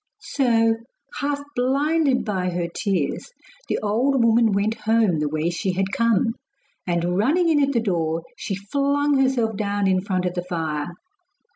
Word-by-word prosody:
So, 230 -4 +1 0.4
half 285 0 -2
blinded 275 +2 +1
by 190 -4 -1
her 175 -1 -2
tears, 180 - -2 0.4
the - - 0
old 240 +5 +2
woman 230 -1 +4
went 200 +2 +1
home 220 -6 +1
the 150 -1 0
way 155 +3 -1
she 180 +2 -2
had 190 +1 -1
come, 230 -1 +2 0.5
and 175 +1 0
running 330 - +2
in 300 -2 +3
at 280 0 +2
the 240 - +1
door, 165 -5 -1
she 195 - -4
flung 280 +7 0
herself 245 -5 +1
down 205 -1 -1
in 185 -1 +2
front 185 -2 -2
of 180 - -1
the 180 - -2
fire. 160 -4 -3
210 Hz, 160 wpm, -23 LUFS, 180-260 Hz, 0.5 s, woman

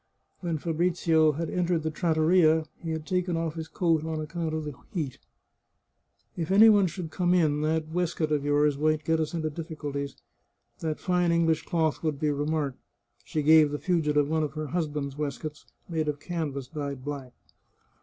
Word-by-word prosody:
When 170 -3 -2
Fabrizio 165 -1 +2
had 165 +3 -3
entered 175 -2 0
the 160 - -1
trattoria 160 0 +3 0.2
he 165 - -5
had 160 -1 -3
taken 180 0 0
off 165 -1 -2
his 160 -1 -6
coat 165 -3 +1
on 160 -1 -3
account 160 +1 -3
of 160 - -2
the 150 - -5 0.2
heat. 155 - -3 0.6
" - - -46
If 165 -2 -3
any 210 +4 +8
one 205 -3 +5
should 165 -1 -6
come 180 -1 +2
in, 150 -4 +2
that 155 0 0
waistcoat 165 -1 -1
of 150 -2 +1
yours 145 0 +2
might 155 0 +1
get 160 +1 +2
us 160 +2 -2
into 155 -2 -2
difficulties; 145 -3 -5 0.6
that 155 -2 -3
fine 180 -2 +1
English 165 -2 +2
cloth 160 -3 0
would 155 -3 -1
be 150 -1 +1
remarked." 145 -1 -1 0.4
She 155 - -2
gave 155 0 +7
the 145 - -3
fugitive 150 -4 +1
one 160 +1 +1
of 150 -2 -2
her 155 0 -4
husband's 150 -4 -2
waistcoats, 150 +1 -5 0.2
made 160 -3 -1
of 145 -1 -2
canvas 150 -5 -4
dyed 140 -3 -5
black. 140 -4 -5
155 Hz, 180 wpm, -27 LUFS, 150-170 Hz, 0.6 s, any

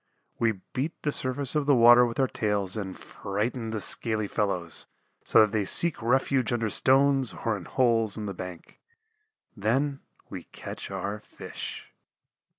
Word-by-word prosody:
We 115 -1 +2 0.2
beat 145 +6 -3
the 150 - 0
surface 130 0 0
of 150 -2 0
the 140 - +5
water 120 +1 +7
with 115 - -6
our 135 - +3
tails 105 -4 -1
and 95 -3 -5
frighten 110 +4 -4
the 110 -1 -3
scaly 110 +1 0
fellows 90 -6 -3 0.4
so - - +5
that 105 -1 +3
they 105 -1 0
seek 165 - 0
refuge 130 +1 +1
under 115 -3 -1
stones 135 +1 +3
or 115 -2 +1
in 95 - -8
holes 115 -5 +2
in 105 - -4
the 100 - -4
bank. 90 -2 -9 0.8
Then 135 +7 0 0.3
we - - -8
catch - - -8
our 100 +2 -4
Fish. 105 - -8
115 Hz, 155 wpm, -27 LUFS, 105-130 Hz, 0.8 s, water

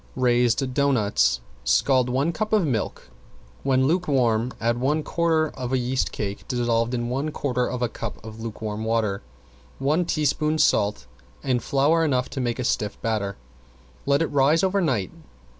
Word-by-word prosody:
~RAISED 125 +1 +2
DOUGHNUTS~ 105 - +2 0.2
Scald 130 -2 +3
one 135 +6 +1
cup 215 +6 -3
of 210 -5 +4
milk. 120 -7 -3 0.5
When 130 -1 +2
lukewarm 130 -8 +1
add 120 +1 0
one 150 +4 +1
quarter 160 -2 +1
of 125 -1 -6
a 130 - +2
yeast 130 +1 -1
cake 100 -1 -5
dissolved 120 -1 0
in 120 -1 -2
one 135 +5 -2
quarter 125 -4 -1
of 125 -1 -3
a - - +2
cup 115 -1 -6
of 110 0 -9
lukewarm 110 -1 -5
water, 110 -3 0 0.6
one 150 +6 +1
teaspoon 155 -1 0
salt 105 - +2 0.4
and 125 -2 +1
flour 150 +4 +2
enough 130 -5 +1
to 135 - -3
make 120 -2 -1
a 130 - -2
stiff 105 -3 -1
batter. 105 -3 -1 0.7
Let 140 +3 +3
it - - 0
rise 145 +4 +3
over 195 +1 +2
night. 125 - 0
125 Hz, 160 wpm, -24 LUFS, 115-145 Hz, 0.7 s, of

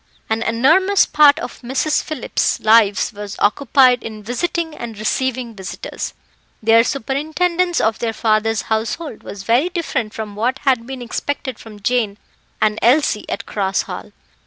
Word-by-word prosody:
An 220 0 +1
enormous 320 +13 +3
part 295 -2 +5
of - - -7
the 240 - -12
Misses 275 +4 +1
Phillips' 310 -6 -1
lives 215 -2 +4
was 205 0 -7
occupied 250 +2 +4
in 215 -1 -8
visiting 320 - -2
and 235 -6 -7
receiving 245 +2 -1
visitors. 190 -1 -6 0.4
Their 225 +1 +5
superintendence 315 +8 0
of 220 0 +1
their 230 -1 -1
father's 220 0 +1
household 225 +5 -3
was 200 -1 -8
very 240 - +2
different 275 - -3
from 215 -2 -6
what 245 +5 0
had 255 -5 +1
been 260 -2 -6
expected 260 +1 -4
from 215 -2 -12
Jane 220 -4 0 0.4
and 215 0 +1
Elsie 245 -3 +2
at - - -4
Cross 195 -2 -1
Hall. - - -8
235 Hz, 150 wpm, -19 LUFS, 220-280 Hz, 0.4 s, part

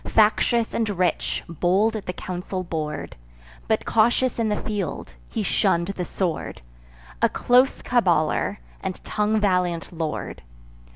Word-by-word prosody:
Factious 225 +2 +3
and 225 -2 0
rich, 185 -3 0
bold 185 +7 +2
at 215 - -5
the 180 - -2
council 185 +1 -4
board, 155 -4 -4 0.5
But - - +1
cautious 240 +3 +2
in 225 -1 +1
the 210 - 0
field, 200 - -3 0.2
he - - -2
shunn'd 170 +2 +1
the 185 -2 -3
sword; 175 -4 -3 0.6
A - - +5
close 250 +2 +3
caballer, 195 -4 +2 0.2
and 190 -2 -3
tongue 210 +1 +1
valiant 180 -4 +1
lord. 160 -2 -4
190 Hz, 130 wpm, -24 LUFS, 175-220 Hz, 0.6 s, A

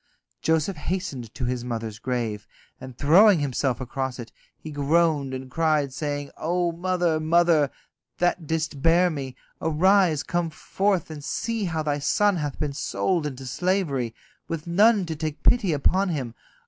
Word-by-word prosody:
Joseph 160 +3 +1
hastened 150 - -4
to 125 - -3
his 125 0 -2
mother's 115 -3 -4
grave, 115 -5 -3 0.3
and 130 -1 -10
throwing 185 +7 +6
himself 135 -3 -1
across 130 0 -4
it, 120 -2 -8 0.3
he 155 - -9
groaned 145 -1 +1
and 130 0 -6
cried, 155 -3 +1
saying: 145 0 -3
"O 175 +1 0
mother, 175 -1 0
mother, 160 -2 +3 0.5
that 175 -2 0
didst 160 -3 -2
bear 175 +3 +4
me, 135 -4 -5 0.3
arise, 165 0 +3
come 175 -1 -1
forth 190 +2 -1
and 150 -2 -8
see 225 +6 -2
how 160 -3 -2
thy 145 -1 -1
son 205 +6 +2
hath 145 -4 -3
been 145 -2 -2
sold 165 +2 -1
into 135 -2 -7
slavery, 140 - -1 0.3
with 165 -2 -4
none 200 +3 +4
to 165 -1 -4
take 155 0 -5
pity 225 -7 +4
upon 185 +6 +2
him. 135 -8 -3
155 Hz, 155 wpm, -25 LUFS, 135-175 Hz, 0.5 s, throwing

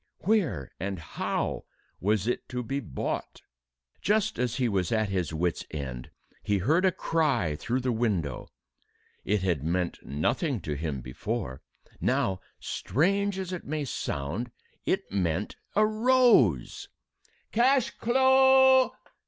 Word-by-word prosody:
Where 165 - +1
and 95 +1 -3
how 80 - -3 0.3
was 105 +1 +1
it 120 - -2
to 125 -1 -3
be 135 +4 -2
bought? 100 - -4 0.6
Just 215 +3 +1
as 125 -1 0
he 130 -2 +1
was 95 -5 0
at 110 -2 +1
his 90 -4 -1
wit's 85 +2 -1
end, 65 -5 -6 0.3
he 105 - +1
heard 155 - +2
a 190 - +5
cry 140 - 0
through 125 - -2
the 125 0 0
window. 100 - -1 0.8
It 100 -1 0
had 85 -7 0
meant 85 +2 -1
nothing 120 - -1
to 75 - -3
him 75 -2 -3
before. 65 - -4 0.4
Now 95 -1 +1 0.2
strange 200 - 0
as 185 -1 -4
it 180 - -5
may 150 0 -2
sound 90 - -3 0.4
it - - 0
meant 95 0 -1 0.2
a 215 - +5
rose! 215 - +3 0.6
"Cash 255 +2 +3
clo'! 265 +1 +5
115 Hz, 130 wpm, -28 LUFS, -, 0.8 s, a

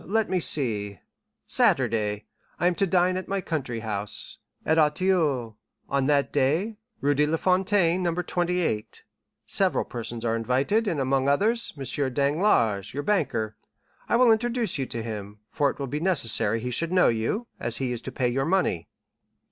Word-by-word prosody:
—Let 215 0 0
me 185 - +2
see—Saturday—I 105 - -1
am 180 - +4
to 195 +3 0
dine 180 +1 +2
at 185 - -5
my 195 0 -1
country 135 -10 -3
house, 105 -2 -4 0.3
at 160 +1 +3
Auteuil, 150 - +1 0.3
on 135 -1 0
that 140 -2 +1
day, 160 +11 +1 0.2
Rue 145 +1 +2
de 150 +1 +2
la 160 +2 0
Fontaine, 185 -1 +2
No. 175 -1 +1
28. 175 -9 -1 0.4
Several - - +1
persons 120 0 -6
are 115 0 +1
invited, 135 - +1
and 165 -7 -1
among 135 0 +1
others, 220 +11 +1
M. 140 - -5 0.3
Danglars, 140 - +1
your 145 - -2
banker. 110 - 0 0.5
I - - +3
will 240 -1 +5
introduce 230 - 0
you 135 - -2
to 115 -1 -5
him, 105 -2 -6
for 145 -2 +2
it - - -6
will 140 - -3
be 145 +3 -3
necessary 115 - +3
he 125 +1 -3
should 165 +7 0
know 185 -1 +4
you, 115 - -1
as 115 - -3
he 130 -2 -2
is 120 -2 -4
to - - -7
pay 125 - 0
your 135 +3 0
money." 165 - 0
145 Hz, 165 wpm, -26 LUFS, 115-185 Hz, 0.5 s, will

